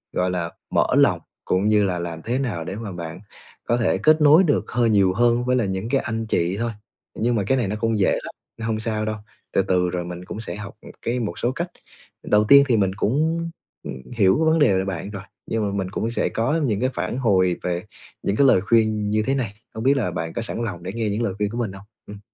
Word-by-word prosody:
gọi 90 0 +1
là, 85 -2 -2 0.2
mở - - +3
lòng - - +4 0.3
cũng 95 +3 +1
như 105 -1 +4
là 90 -2 -1
làm 85 -1 -5
thế 125 +3 -1
nào 115 -12 -2
để 95 - -5
mà 110 -1 -6
bạn 85 -2 -7 0.5
có 120 - +2
thể 120 - +1
kết 155 0 +4
nối 150 +5 +7
được 155 -5 +1
hơi 120 -1 +2
nhiều 100 -3 +4
hơn 120 +3 +2
với 125 0 +2
lại 120 -5 +1
những 95 +3 -3
cái 135 +1 +2
anh 115 -1 -3
chị 85 +1 0
thôi. 115 0 -1 0.5
Nhưng 120 +1 +1
mà 105 - +1
cái 135 - +3
này 120 -5 0
nó 100 - -2
cũng 115 0 +1
dễ 95 - +3
lắm, - - -4 0.2
nên 115 - -5
hông 110 -1 -1
sao 110 -1 -2
đâu, 110 0 -2 0.4
từ - - +4
từ 90 -1 +1
rồi 90 0 -3
mình 90 +1 -7
cũng 100 - -7
sẽ 110 - -5
học, 105 0 -8
ừm, - - -11
cái 120 +2 -1
một 110 -4 -4
số 120 - +1
cách. 170 +5 -4 0.5
Đầu 105 0 +3
tiên 140 0 +9
thì 120 -4 +3
mình 95 -2 +2
cũng, 160 +10 0 0.3
ừm, - - -5 0.2
hiểu 100 -5 +4
cái 160 - +1
vấn 160 +1 +3
đề 145 -9 +5
về 95 - 0
bạn 95 0 -4
rồi, 100 -3 -7 0.2
nhưng 115 -1 -1
mà - - -4
mình 95 -2 -2
cũng 115 +3 -2
sẽ - - 0
có 130 +9 0
những 105 -6 0
cái 130 - +2
phản 90 +7 -3
hồi 95 -8 +3
về 90 -1 -2 0.4
những 100 - 0
cái 140 +4 +5
lời 95 - +5
khuyên 110 0 +2
như 110 0 +2
thế 135 - +2
này, 120 -7 -2 0.2
hông 110 - -4
biết 135 +2 +4
là 105 -9 0
bạn 80 -1 -4
có - - -3
sẵn 115 +1 -3
lòng 90 -6 -5
để 95 +2 -5
nghe 115 -1 -1
những 105 +3 -1
lời 100 - -1
khuyên 105 0 0
của 115 - -5
mình 115 -5 -1
hông? 95 +1 -12 0.2
Ừm. 105 0 -9
110 Hz, 265 wpm, -23 LUFS, 95-120 Hz, 0.5 s, tiên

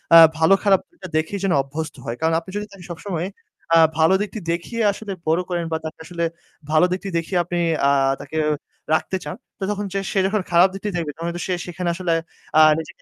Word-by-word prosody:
আ - - +12 0.2
ভালো-খারাপটা 195 +4 +4
দিকটা 185 -2 -11
দেখেই 175 +6 -1
যেন 195 - +2
অভ্যস্ত 150 +4 -5
হয়। 115 - -3
কারণ 160 0 +2
আপনি 170 - -14
যদি 210 - -3
তাকে 190 -3 -13
সবসময় 175 0 -4 0.5
আ - - +8 0.2
ভালো 160 +4 +5
দিকটি 210 +1 -4
দেখিয়ে 205 +7 -3
আসলে 205 0 -7 0.2
বড় 165 +3 +3
করেন 170 -1 -1
বা 160 - +1
তাকে 155 - -6
আসলে 170 0 -4 0.5
ভালো 155 +3 +5
দিকটি 190 +2 -3
দেখিয়ে 170 +2 -1
আপনি 175 +1 -3 0.3
আ - - +5 0.3
তাকে 145 +3 -6 0.6
রাখতে 190 +4 +1
চান - - -5 0.2
তো - - -4
তখন 205 0 -3 0.3
সে 195 - +1
যখন 205 0 0
খারাপ 175 +2 +7
দিকটি 200 +2 -4
দেখবে 165 -4 -2
তখন 165 +2 -5
কিন্তু 175 +1 -4
সে 185 - 0
সেখানে 175 0 -3
আসলে 175 -2 0 0.4
আ - - +8 0.2
নিজেকে 160 - -9
175 Hz, 205 wpm, -22 LUFS, 160-195 Hz, 0.6 s, আ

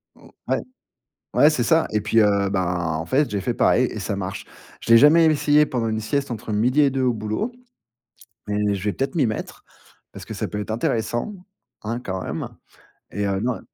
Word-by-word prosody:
Mmh, - - -18 0.2
ouais. - - +1 0.8
Ouais, 150 - +6
c'est 150 - -1
ça 160 +6 +3
et 105 - 0
puis, 110 +2 +3
heu, 100 -2 +2
bah 90 -4 -1
en 80 - -4
fait, 140 - +1
j'ai 100 - -2
fait 120 +5 -2
pareil 125 - +3
et 110 - -5
ça 100 +1 -3
marche. 95 -1 -5 0.4
Je - - -8
l'ai 115 - +9
jamais 155 +6 +6
essayé 150 -1 +3
pendant 120 -3 -2
une 110 0 -1
sieste 140 +5 -2
entre 110 -1 -5
12:00 125 +7 +2
et 140 - +4
2 135 0 -1
au 125 -1 +2
boulot, 110 - -3 1.0
mais 105 0 0
je 95 - -7
vais 105 - 0
peut-être 135 - -3
m'y 145 -6 +3
mettre, 110 -1 -5 0.5
parce - - -10
que - - -8
ça - - -3
peut 105 - -5
être 105 - -6
intéressant, 120 - -1 0.5
hein, 115 +2 -3
quand 95 -6 -5
même - - -4 0.6
et 100 0 -3
heu, 100 -1 0
non 120 0 -1
110 Hz, 210 wpm, -22 LUFS, 105-135 Hz, 1.0 s, l'ai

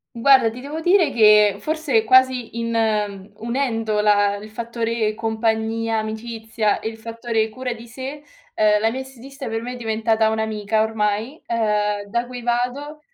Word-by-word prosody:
Guarda, 255 -1 +5
ti 245 +3 -9
devo 295 +4 -6
dire 350 -4 +4
che, 210 -3 +5
forse, 295 -5 0
quasi 255 -1 +3
in 210 -3 -1
unendo 225 -3 -1
la 205 -1 +3
il 215 +1 -10
fattore 230 -1 -2
compagnia, 225 0 -1
amicizia, 220 -1 -2
e 220 - -3
il 225 - -12
fattore 230 -1 -2
cura 250 +2 -5
di 235 0 -10
sé, 265 +5 -7 0.3
ehm, 210 -1 +3
la 225 - +3
mia 260 +3 -4
estetista 265 0 -9
per 225 0 -3
me 250 +1 -5
è - - -7
diventata 220 -1 +1
un'amica, 220 -1 0
ormai, 220 +5 -2
ehm, 210 -3 0
da 235 +2 -1
cui 250 -1 -8
vado, 250 +6 -2
225 Hz, 155 wpm, -21 LUFS, 220-245 Hz, 0.3 s, Guarda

